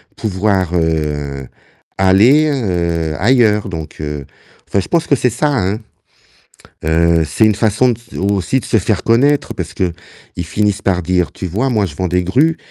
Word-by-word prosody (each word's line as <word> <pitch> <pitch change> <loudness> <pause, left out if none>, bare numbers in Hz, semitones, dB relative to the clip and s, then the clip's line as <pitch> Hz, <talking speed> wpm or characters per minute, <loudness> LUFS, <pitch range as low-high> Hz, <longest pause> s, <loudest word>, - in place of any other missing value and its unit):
pouvoir, 95 -3 -1
heu, 75 -5 -2 0.5
aller, 110 +12 +4
heu, 85 - -1
ailleurs, 105 -2 +3
donc 80 -4 -7
heu, 75 -2 -5 0.4
enfin, 100 - 0
je - - -8
pense 170 -2 0
que 140 - +3
c'est 125 -2 0
ça, 130 +6 0
hein. 105 -6 0 1.1
Heu, 80 0 +2
c'est 80 +9 +2
une 105 - +3
façon 110 +4 +2 0.2
de - - -7
aussi 100 +6 0
de - - -13
se - - +1
faire 100 0 -1
connaître, 140 +6 +2
parce - - -5
qu'ils 90 0 -6
finissent 100 +3 -1
par 90 -3 0
dire: 90 0 0
«Tu 95 - -6
vois 115 +10 -1
moi 105 -4 +1
je 75 - -8
vends 90 -1 -1
des 90 +1 +1
grues, 145 - +2
95 Hz, 170 wpm, -16 LUFS, 85-115 Hz, 1.1 s, aller